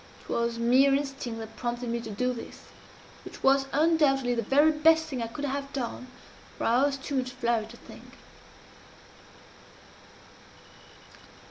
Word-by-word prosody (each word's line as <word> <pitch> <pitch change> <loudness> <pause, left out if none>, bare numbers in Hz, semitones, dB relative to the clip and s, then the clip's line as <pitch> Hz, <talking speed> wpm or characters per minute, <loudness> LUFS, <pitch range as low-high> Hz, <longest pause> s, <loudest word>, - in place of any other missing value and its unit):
It - - -20
was 235 0 -1
mere 260 +4 +4
instinct 270 -4 -4
that 220 0 -9
prompted 240 0 -4
me 235 0 -2
to - - -8
do 250 +5 -1
this 235 - -9 0.6
which - - -11
was 270 0 +4
undoubtedly 285 -5 +2
the 235 - 0
very 290 +6 +4
best 320 +1 +4
thing 260 -4 -5
I 230 - -2
could 285 +5 -5
have 280 0 -4
done 255 -1 -4 0.5
for - - -5
I 245 +4 +3
was 275 -1 -3
too 275 +1 -4
much 255 -1 -1
flurried 235 -3 -1
to 240 - -12
think. - - -14
260 Hz, 150 wpm, -27 LUFS, 235-280 Hz, 0.6 s, mere